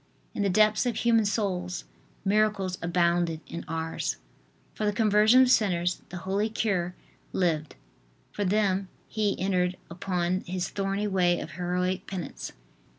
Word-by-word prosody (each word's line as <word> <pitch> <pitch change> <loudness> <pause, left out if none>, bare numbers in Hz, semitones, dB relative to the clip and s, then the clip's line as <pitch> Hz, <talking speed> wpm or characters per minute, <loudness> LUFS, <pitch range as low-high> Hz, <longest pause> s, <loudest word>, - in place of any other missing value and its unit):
In - - -2
the 200 - +2
depths 215 +4 +4
of 240 - 0
human 230 -2 +3
souls 185 -4 -1 0.4
miracles 200 -2 +2
abounded 170 -1 +1
in 170 - -6
Ars. 160 0 -2 0.6
For - - -4
the 210 - +1
conversion 215 +4 +5
of 255 - +3
sinners 180 -6 +2
the 180 - -6
holy 200 +3 0
cure 185 -5 -1 0.4
lived; 160 -4 0 0.6
for 205 - -2
them 195 -1 +1 0.2
he 210 -3 -1
entered 180 -1 +1
upon 180 0 -1
his 180 0 -2
thorny 195 +1 -1
way 180 -3 +2
of 160 - -6
heroic 180 +2 -1
penance. 185 -3 -5
190 Hz, 140 wpm, -28 LUFS, 175-210 Hz, 0.6 s, conversion